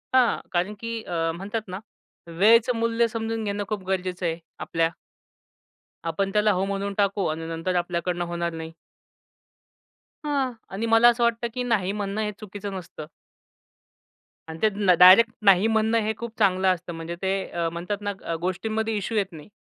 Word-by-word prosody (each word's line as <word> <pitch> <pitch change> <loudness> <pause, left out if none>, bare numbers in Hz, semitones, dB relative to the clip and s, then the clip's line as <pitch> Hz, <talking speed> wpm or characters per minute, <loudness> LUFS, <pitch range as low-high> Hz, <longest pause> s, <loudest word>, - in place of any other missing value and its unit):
हां 250 -2 +4
कारण 185 +4 0
की 230 -1 -4
अ, 165 -1 -1
म्हणतात 205 +4 -5
ना 185 +1 -6 0.5
वेळेचं 225 +8 +4
मूल्य 230 0 +2
समजून 225 -1 -3
घेणं 205 0 -2
खूप 205 -3 -3
गरजेचं 185 -1 -2
आहे 165 0 -1 0.2
आपल्या. 165 0 0 1.2
आपण 195 +4 -1
त्याला 210 0 +3
हो 185 +1 0
म्हणून 200 0 -3
टाकू 200 -1 +1
आणि 160 +1 -3
नंतर 165 +3 -2
आपल्याकडनं 175 0 -1
होणार 170 0 -2
नाही. 160 0 -6 1.5
हां 275 -3 0 0.2
आणि 220 +4 -2
मला 225 +1 +6
असं 240 0 +1
वाटतं, 235 0 +1
की 250 - -2
नाही 205 -6 0
म्हणणं 205 +1 -3
हे 210 0 -1
चुकीचं 205 -1 -7
नसतं. 175 -4 -9 1.4
आणि 160 0 -7
त्यांना 205 -3 +3
डायरेक्ट 195 +6 +9
नाही 195 +2 +6
म्हणणं 220 +1 +2
हे 215 +1 -1
खूप 235 -1 -7
चांगलं 190 -2 +3
असतं. 175 0 -7
म्हणजे 165 +1 -6
ते 190 0 0 0.2
अ, 170 -1 -1
म्हणतात 180 +5 -4
ना 205 0 -2
अ, 165 - -2
गोष्टींमध्ये 220 +5 -1
इश्यू 215 +3 -2
येत 195 -2 0
नाही. 155 +1 -11
200 Hz, 165 wpm, -25 LUFS, 175-220 Hz, 1.5 s, डायरेक्ट